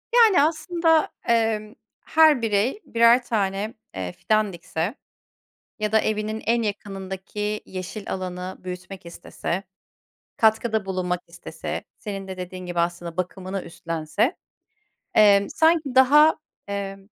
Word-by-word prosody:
Yani 445 -9 +7
aslında, 325 +1 +2 0.2
eee, 225 -2 +1 0.3
her 310 -5 +5
birey 225 - +1
birer 235 +2 +5
tane, 205 -2 -1 0.2
eee, 90 -1 -3
fidan 215 - 0
dikse 170 - -3 0.8
ya 215 0 -2
da 220 - +5
evinin 215 0 -2
en 235 0 +2
yakınındaki 200 0 -4
yeşil 190 +2 -6
alanı 185 0 -5
büyütmek 180 0 -8
istese, 170 +2 -4 0.8
katkıda 220 -1 +2
bulunmak 180 -2 -1
istese 170 -1 -6 0.2
senin 195 -2 -6
de 190 -1 -7
dediğin 185 0 -7
gibi 175 -1 -3
aslında 170 0 -2
bakımını 185 +1 -3
üstlense, 170 - -2 0.8
emm, 200 -2 +6
sanki 320 -5 +2
daha, 295 +5 +6 0.3
eee, 200 -1 -3
205 Hz, 115 wpm, -24 LUFS, 185-230 Hz, 0.8 s, Yani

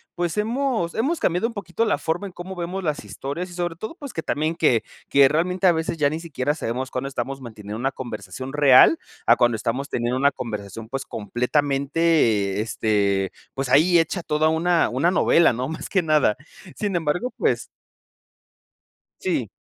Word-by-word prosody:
pues, 175 +2 -2
hemos 230 -4 0
hemos 285 +10 0
cambiado 180 +5 +1
un 235 - -8
poquito 205 0 -2
la 215 - +1
forma 170 +5 -2
en - - -10
cómo 180 +2 -8
vemos 180 +2 -4
las 150 -3 -2
historias, 165 +7 -5
y - - -11
sobre 175 -1 -3
todo, 220 - -7
pues, 285 -6 -9
que 160 - -3
también 155 +2 -1
que 140 -9 +2 0.3
que 140 -1 +6
realmente 180 +6 0
a 180 - +7
veces 160 0 -2
ya 145 -2 +3
ni 155 - -3
siquiera 145 -4 -2
sabemos 130 -3 -4
cuándo 130 +2 -3
estamos 135 +1 -4
manteniendo 110 -3 -8
una 135 +3 0
conversación 120 +1 -7
real, 145 - +6 0.3
a - - +6
cuando 120 -1 +2
estamos 125 +6 -2
teniendo 120 +1 -1
una 140 +2 +3
conversación, 110 -3 -6
pues, 135 +2 -4
completamente, 130 -2 +1
este, 100 -3 0 0.2
pues, 135 0 -2
ahí 165 +7 +5
hecha 165 +2 +1
toda 155 -1 +1
una 170 +2 +2
una 135 +8 +1
novela, 170 -4 +4
¿no?, 125 +2 -3
más 160 - -6
que 190 -3 +1
nada. 155 -9 +3 0.4
Sin 205 -3 -2
embargo, 175 +9 -1
pues - - +1 1.6
Sí. - - -1
150 Hz, 175 wpm, -23 LUFS, 125-175 Hz, 1.6 s, a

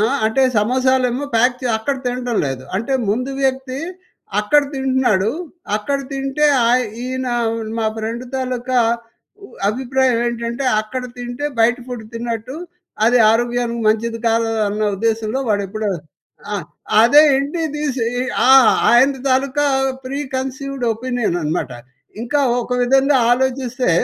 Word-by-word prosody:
ఆ! - - +3 0.3
అంటే 265 +5 +1 0.2
సమోసాలే 255 +3 +2
ఏమో 285 +3 -4
ప్యాక్ 245 +2 +3
చే 250 - -1
అక్కడ 270 +5 -2
తినటం 245 -2 -2
లేదు. 130 -1 -5
అంటే 230 +6 -3 0.2
ముందు 250 +5 -1
వ్యక్తి 265 0 -1 0.6
అక్కడ 250 +8 +4
తింటున్నాడు. 260 -7 +1 0.5
అక్కడ 275 +7 -1
తింటే 275 +2 0 0.2
ఆయ్ 250 +1 +3 0.2
ఈయనా 255 -1 -3 0.4
మా 225 - -1
ఫ్రెండు 230 +3 -4
తాలూకా 255 -1 -1 0.9
అభిప్రాయం 260 +2 +1
ఏంటంటే 235 +2 -3 0.2
"అక్కడ 250 +4 -5 0.2
తింటే 245 +4 -4
బయట 240 +2 +4
ఫుడ్ 245 -3 -6
తిన్నట్టు, 235 +3 -4 0.5
అది 245 +2 +4
ఆరోగ్యానికి 240 +1 0
మంచిది 230 +1 0
కాదు." 230 0 +2 0.2
అన్న 210 +1 -4 0.2
ఉద్దేశంలో 225 +3 -1
వాడెప్పుడు 205 +1 -1 0.6
ఆ! 205 - 0 0.5
అదే 290 +6 +7
ఇంటికి 310 +4 -2
తీసి 285 -5 -2 0.5
ఆ! - - +7 0.4
ఆయనది 265 +2 +4
తాలూకా 275 +2 +1 0.4
ప్రీ 275 +2 -4 0.2
కన్సీవ్‌డ్ 265 0 -4
ఒపీనియన్ 245 -5 -2
అనమాట. 155 -2 -2 0.5
ఇంకా 285 +5 0 0.2
ఒక 250 - -10
విధంగా 270 +2 +3
ఆలోచిస్తే 255 -1 0
250 Hz, 125 wpm, -19 LUFS, 230-265 Hz, 0.9 s, అదే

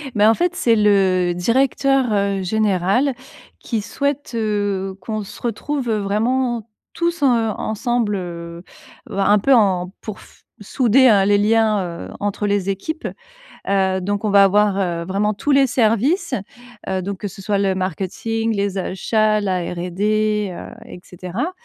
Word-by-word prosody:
Ben, 210 +1 +5
en - - +5
fait, 355 +7 0
c'est 230 -2 +3
le 190 -4 +3
directeur, 265 +7 +2
heu, 200 -2 0
général, 210 +6 +1 0.5
qui 225 -3 -3
souhaite, 280 +5 -3
heu, 205 -3 -1
qu'on 215 +2 -4
se - - -12
retrouve, 245 +2 -3
vraiment, 225 +3 0 0.3
tous, 340 -3 -1
heu, - - +5 0.3
ensemble, 220 -1 -1
heu 170 -1 -7 0.5
heu, - - -6
un 205 +1 +4
peu, 270 +7 +3
en 190 -5 +2
pour 215 -3 -7
f - - -19 0.2
souder, 255 +3 +3
heu, 200 -3 +4
les 205 0 +4
liens, 215 -1 +3 0.3
heu, - - -13
entre 205 0 -2
les 200 -1 0
équipes. 310 - -3 0.6
Heu, 190 -1 +2
donc 205 +3 -2
on 210 - +1
va 200 -1 +7
avoir, 205 0 +3
heu, 170 -3 -2
vraiment 200 +3 0
tous 250 +8 -2
les 275 -1 +5
services, 255 - +1 0.6
heu 190 -1 -1
donc 195 +1 -4
que 205 - -4
ce 195 +1 -10
soit 200 +1 0
le 195 -1 +1
marketing, 215 +4 -2
les 200 -1 -1
achats, 215 +3 +1
la 190 -3 0
R&D, 210 +3 0
heu 175 - -9
et 205 - -10
cetera 185 - -5
205 Hz, 160 wpm, -20 LUFS, 195-230 Hz, 0.6 s, va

